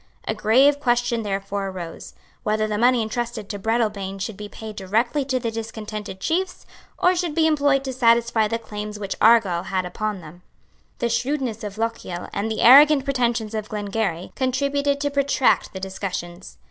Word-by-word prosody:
A - - +1
grave 260 +7 +4
question 240 -3 +1
therefore 195 -1 -3
arose, 180 -3 -8 0.3
whether 215 0 0
the 210 -1 -2
money 245 0 +4
entrusted 230 -1 -4
to 205 - -5
Breadalbane 210 -3 -1
should 200 +2 -4
be 205 +1 -8
paid 220 0 -9
directly 225 +9 0
to 260 -1 0
the 230 -2 -3
discontented 215 -3 -6
chiefs, 365 - -2 0.3
or 360 +1 +3
should 345 -4 -2
be 325 - +3
employed 285 -3 +2
to 265 -1 -4
satisfy 235 -2 +3
the 230 +2 -1
claims 210 -2 -7
which 200 -2 -4
Argyle 210 -6 +5
had 185 -1 -1
upon 205 +2 -3
them. 165 +2 -13 0.6
The 235 - -1
shrewdness 245 -1 -1
of 205 0 -6
Lochiel 225 -6 -4
and 210 +2 -2
the 220 - -2
arrogant 280 +2 +8
pretensions 240 -5 0
of 215 -1 -4
Glengarry 205 -4 -3
contributed 280 +2 0
to 285 0 0
protract 280 -2 +2
the 190 - -7
discussions. 190 -2 -6
225 Hz, 170 wpm, -23 LUFS, 205-255 Hz, 0.6 s, arrogant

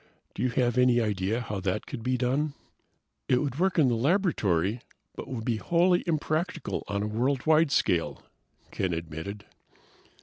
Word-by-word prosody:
Do - - -6
you 125 - +2
have 125 0 +1
any 125 -1 +5
idea 105 +1 0
how 105 -4 -4
that 95 +2 -2
could - - -6
be 125 +2 0
done?" 135 +4 0 0.7
"It 125 - +4
would 140 0 -3
work 190 0 +1
in 150 -5 +5
the 120 - +2
laboratory, 115 - +1 0.3
but - - -7
would 115 -4 -5
be 115 -2 0
wholly 175 +7 +2
impractical 160 +2 -1
on 100 0 -2
a - - -1
worldwide 140 +8 +2
scale," 85 - +1 0.5
Ken 95 -3 -1
admitted. 80 +5 -6
125 Hz, 160 wpm, -28 LUFS, 100-150 Hz, 0.7 s, any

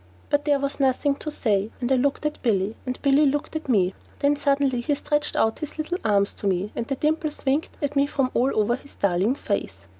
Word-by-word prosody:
But 290 0 +2
there 290 -2 +3
was 280 +1 -3
nothing 275 +1 +2
to 305 - -5
say, 210 -8 0
and 245 +1 -2
I - - +6
looked 280 +3 0
at 300 - -2
Billy, 210 -2 +1
and 255 - -3
Billy 280 +1 +5
looked 290 +3 -1
at 315 -3 -4
me. 190 -6 +3 0.2
Then 285 +1 +2
suddenly 275 -3 +1
he 285 +4 0
stretched 295 +1 -1
out 220 0 +1
his 305 0 -6
little 335 +4 -2
arms 200 -2 +2
to 205 - -1
me, 190 +2 0
and 230 - -3
the 275 - -1
dimples 305 +1 -1
winked 275 +4 0
at 285 0 -1
me 280 0 +3
from 270 -3 0
all 250 +3 +2
over 220 +3 +2
his 280 +2 -15
darling 200 +5 +1
face. 100 - -3
270 Hz, 230 wpm, -24 LUFS, 220-290 Hz, 0.2 s, I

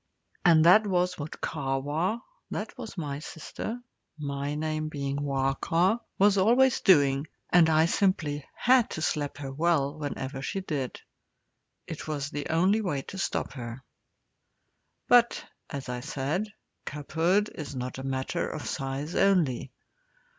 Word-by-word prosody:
And 165 -3 +6
that 210 +5 +7
was 180 -2 +1
what 145 +1 -6
Kahwa 145 - -1 0.3
that - - -4
was 230 -6 -8
my 145 -4 -3
sister, 165 +9 -6 0.4
my 140 -1 -3
name 155 0 -2
being 140 -2 -3
Wahka 145 - +1 0.2
was 200 0 +5
always 245 +6 +4
doing, 140 -5 +4 0.2
and 170 -2 +6
I 160 0 +5
simply 165 -6 +1
had 250 -1 +4
to 160 - -5
slap 145 -3 -1
her 140 -2 -5
well 150 -1 +1
whenever 135 -2 -4
she 195 +8 -3
did. 145 -8 -3 0.9
It - - -7
was 145 -2 -3
the 145 -1 -4
only 185 +7 +3
way 145 -9 -2
to 190 - -8
stop - - -2
her. 120 0 -7 1.2
But, 240 -1 +4 0.2
as 140 -3 -5
I 125 0 -3
said, 150 - -2 0.4
cubhood 165 +8 0
is 145 -3 -7
not 125 +1 -4
a - - -6
matter 130 -1 -2
of - - -6
size 135 +4 -3
only. 180 -11 +2
155 Hz, 140 wpm, -28 LUFS, 140-185 Hz, 1.2 s, that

